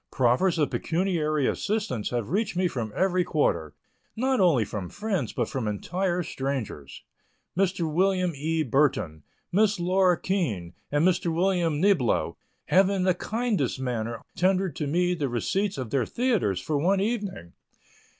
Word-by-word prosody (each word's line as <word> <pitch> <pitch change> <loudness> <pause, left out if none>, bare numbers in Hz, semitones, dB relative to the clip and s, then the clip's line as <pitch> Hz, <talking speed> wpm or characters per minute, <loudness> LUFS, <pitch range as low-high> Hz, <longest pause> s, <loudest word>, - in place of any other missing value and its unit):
Proffers 130 +9 +2
of 150 -3 +1
pecuniary 160 -5 0
assistance 205 - -1
have 120 +1 -3
reached 205 0 0
me 180 0 +2
from 115 -9 -4
every 185 -1 +2
quarter, 85 - 0 0.4
not 260 +2 +1
only 160 - +4
from 95 -3 -5
friends, 200 - -2
but 120 - -1
from 125 -5 -3
entire 175 - -1
strangers. 130 - -5 0.5
Mr. 185 -1 +1
Wm. 180 +2 +1
E. 160 +3 -1
Burton, 125 - +1 0.3
Miss 205 +1 +3
Laura 180 0 +3
Keene 110 - -2 0.2
and 145 +4 +3
Mr. 180 -1 +1
Wm. 170 -3 +1
Niblo 175 - +2 0.3
have 190 +1 +4
in 195 -2 0
the 185 0 +3
kindest 210 - -1
manner 115 -3 -3
tendered 185 0 +1
me 175 +5 +1
the 150 -6 -2
receipts 190 - -1
of 125 -5 -5
their 130 -5 +1
theatres 225 - 0
for 145 +10 -1
one 190 +6 +2
evening. 200 - -3
170 Hz, 145 wpm, -26 LUFS, 125-190 Hz, 0.5 s, only